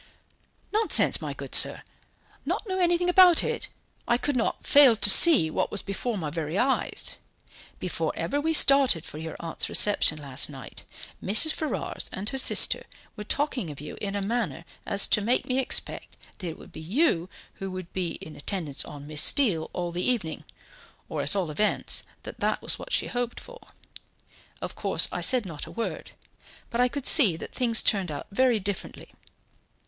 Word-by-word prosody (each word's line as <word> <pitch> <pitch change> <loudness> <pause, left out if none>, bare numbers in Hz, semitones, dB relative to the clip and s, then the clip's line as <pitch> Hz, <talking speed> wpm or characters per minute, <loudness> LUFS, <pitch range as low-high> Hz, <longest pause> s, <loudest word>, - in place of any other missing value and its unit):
"Nonsense, 435 +1 +3
my - - -6
good - - -10
sir; - - +4 0.6
not - - -4
know 375 -1 -3
anything 350 0 0
about 360 -1 +6
it! - - -4 0.4
I 240 - +1
could 285 +2 -3
not 235 - -3
fail 280 -5 +6
to 205 - +5
see 265 - +7
what - - -2
was 205 - -2
before 210 +3 -4
my 155 -5 -5
very 160 +2 -5
eyes. 265 +3 -2 0.6
Before - - -4
ever 285 - -3
we 320 +2 -1
started 275 - +5
for 150 - -10
your 160 -1 -8
aunt's 165 -1 -4
reception 200 -7 +4
last 140 -2 -1
night, 135 -4 -12 0.4
Mrs. 215 +11 +3
Ferrars 310 - -5
and 200 +3 -5
her 270 - -4
sister - - +6 0.3
were 210 - -8
talking 255 - -3
of 145 - -10
you 150 - -9
in 200 -1 -4
a 200 - -3
manner 220 -5 -4 0.2
as 200 0 +4
to 210 - +1
make 235 +5 -1
me 255 +1 -2
expect 265 - -3 0.2
that 185 - -6
it 165 - -7
would - - -16
be 155 - -11
you 185 - -1 0.3
who 195 - -5
would 185 -2 -9
be 180 -3 -4
in 155 - -12
attendance 150 -4 -4
on 145 -1 -11
Miss 150 0 -1
Steele 200 - +2
all 175 -1 -5
the 175 +1 -5
evening 195 -11 -3 0.6
or - - -4
at - - +1
all 180 -6 -3
events, 210 +8 -2 0.2
that - - -10
that - - -1
was - - +1
what - - -11
she - - +1
hoped 245 -1 -5
for. - - -15 1.0
Of - - -6
course, - - +1
I - - -5
said 255 -5 +2
not 165 -5 -7
a - - -11
word, 230 - -6 0.6
but 235 - -1
I 250 - +3
could 275 +2 -7
see 210 - +5
that - - -10
things 235 -3 +1
turned 195 -6 0
out 145 - -7
very 245 +1 +1
differently. 200 0 -6
205 Hz, 185 wpm, -25 LUFS, 165-260 Hz, 1.0 s, see